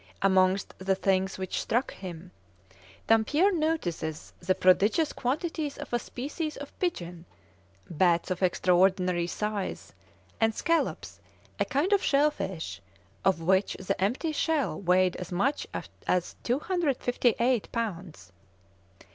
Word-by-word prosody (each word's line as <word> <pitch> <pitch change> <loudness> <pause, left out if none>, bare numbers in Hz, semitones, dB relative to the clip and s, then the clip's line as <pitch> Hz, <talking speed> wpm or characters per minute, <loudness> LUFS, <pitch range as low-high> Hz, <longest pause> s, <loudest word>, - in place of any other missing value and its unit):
Amongst 190 0 +3
the 190 0 +1
things 190 0 0
which 190 -1 -3
struck 240 +4 0
him, 180 -1 -9 0.7
Dampier 290 - +3
notices 250 - -2
the 185 +1 +1
prodigious 205 - +3
quantities 295 +3 -2
of - - -8
a 240 - +2
species 295 +6 -5
of 285 0 -8
pigeon, 175 - -3 0.6
bats 175 +1 +2
of 185 - -2
extraordinary 180 -1 +2
size, 210 +1 -4 0.5
and 225 0 +2
scallops, 335 -1 -1 0.4
a - - +2
kind 305 +9 +1
of 400 - +4
shell 290 +1 +3
fish, 190 - -5 0.4
of 190 -4 +2
which 190 +4 +2
the 190 0 -2
empty 255 - 0
shell 310 -4 0
weighed 180 -1 +3
as 180 -1 -7
much 245 +12 0 0.4
as 180 -1 0
258 250 - +1
lbs. 175 - -5
195 Hz, 120 wpm, -28 LUFS, 185-280 Hz, 0.7 s, of